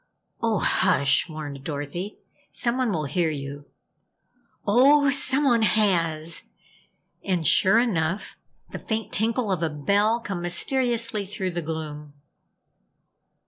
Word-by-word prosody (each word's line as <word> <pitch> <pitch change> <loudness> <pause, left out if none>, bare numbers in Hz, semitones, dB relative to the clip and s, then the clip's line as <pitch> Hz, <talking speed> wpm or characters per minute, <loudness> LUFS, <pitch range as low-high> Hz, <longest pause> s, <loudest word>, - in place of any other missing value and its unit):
"Oh, 225 -2 +1
hush," 140 -1 +2
warned 145 -3 -7
Dorothy. 150 +7 -5 0.3
"Someone 245 -1 0
will 155 -5 -2
hear 160 +4 0
you! 145 -1 -6 1.0
Ooooh! 275 +6 +5
Someone 270 -3 +2
has!" 170 -7 +1 0.8
And 180 -4 -1
sure 190 +8 +5
enough, 195 -6 -1 0.4
the - - -6
faint 220 0 -4
tinkle 225 0 0
of 180 -3 -1
a 165 - 0
bell 200 +10 +1
come 195 -6 -5
mysteriously 230 +4 +1
through 190 -2 -3
the 175 0 -3
gloom. 150 -2 -6
185 Hz, 110 wpm, -24 LUFS, 155-230 Hz, 1.0 s, Ooooh